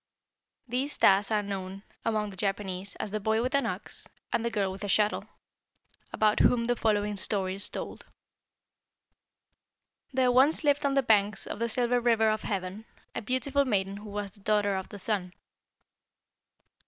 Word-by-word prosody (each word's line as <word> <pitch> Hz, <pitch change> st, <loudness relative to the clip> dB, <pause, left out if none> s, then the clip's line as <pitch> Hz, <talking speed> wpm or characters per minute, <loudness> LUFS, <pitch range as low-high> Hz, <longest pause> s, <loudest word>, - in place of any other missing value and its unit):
These 260 Hz, +4 st, -1 dB
stars 195 Hz, +1 st, +4 dB
are 210 Hz, -2 st, +1 dB
known 195 Hz, 0 st, -5 dB, 0.2 s
among 215 Hz, -2 st, 0 dB
the -, -, -10 dB
Japanese 195 Hz, 0 st, -3 dB
as 210 Hz, -, -4 dB
the 215 Hz, -, -1 dB
'boy 220 Hz, +2 st, +1 dB
with 255 Hz, +2 st, -2 dB
an 280 Hz, 0 st, +2 dB
ox' -, -, -3 dB, 0.3 s
and 230 Hz, -, +1 dB
'the 235 Hz, -, 0 dB
girl 205 Hz, -4 st, 0 dB
with 195 Hz, +2 st, -8 dB
a -, -, -2 dB
shuttle,' 210 Hz, +1 st, +2 dB, 0.9 s
about 215 Hz, 0 st, +2 dB
whom 235 Hz, -1 st, +4 dB
the 245 Hz, +1 st, +1 dB
following 210 Hz, -3 st, 0 dB
story 190 Hz, -1 st, -2 dB
is 200 Hz, +1 st, -3 dB
told: -, -, -6 dB, 2.1 s
"There 255 Hz, -1 st, +3 dB
once 270 Hz, +6 st, +4 dB
lived 290 Hz, 0 st, +3 dB
on 275 Hz, -, 0 dB
the 275 Hz, -, +3 dB
banks 210 Hz, -3 st, +2 dB
of -, -, -6 dB
the 235 Hz, 0 st, 0 dB
Silver 245 Hz, +1 st, +2 dB
River 225 Hz, -2 st, +3 dB
of 215 Hz, -, -1 dB
Heaven 195 Hz, +1 st, -4 dB, 0.3 s
a -, -, -3 dB
beautiful 260 Hz, +5 st, +1 dB
maiden 200 Hz, -6 st, 0 dB
who 210 Hz, +1 st, -9 dB
was 205 Hz, -1 st, -4 dB
the 205 Hz, -, -19 dB
daughter 205 Hz, -1 st, +1 dB
of 190 Hz, -1 st, -4 dB
the 205 Hz, -, -8 dB
Sun. 190 Hz, -3 st, -2 dB
210 Hz, 170 wpm, -29 LUFS, 200-235 Hz, 2.1 s, stars